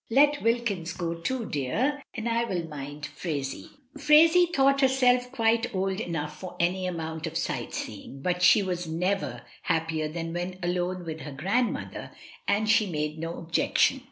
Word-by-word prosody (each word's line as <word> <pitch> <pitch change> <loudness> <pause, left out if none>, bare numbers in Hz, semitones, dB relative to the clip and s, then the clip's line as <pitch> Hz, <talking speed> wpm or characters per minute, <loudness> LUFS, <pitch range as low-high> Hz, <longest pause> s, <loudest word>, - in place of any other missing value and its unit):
Let 290 +4 +4
Wilkins 230 -7 0
go 170 -2 -2
too, 225 +9 -3
dear, 235 - -1
and 225 - -3
I 235 0 +1
will 175 -6 -3
mind 145 -1 -8
Phraisie." 140 -6 -4 0.3
Phraisie 325 +4 +6
thought 275 -2 +3
herself 250 -2 +3
quite 230 -2 +1
old 190 +1 0
enough 150 -6 -4
for 185 -1 -7
any 185 +2 +1
amount 160 -2 -4
of 160 +1 -3
sightseeing, 125 0 -4
but 180 0 0
she 200 - +6
was 180 -2 -3
never 180 +5 -1 0.2
hap 165 -1 0
pier 155 -1 -1
than 165 +1 -4
when 175 +1 -3
alone 180 +1 -1
with 160 -1 -5
her 150 - -7
grandmother, 195 - -1 0.4
and 205 +2 +2
she 215 -1 +4
made 150 -2 -3
no 165 +1 -4
objection. 170 +10 +2
180 Hz, 160 wpm, -27 LUFS, 160-235 Hz, 0.4 s, Phraisie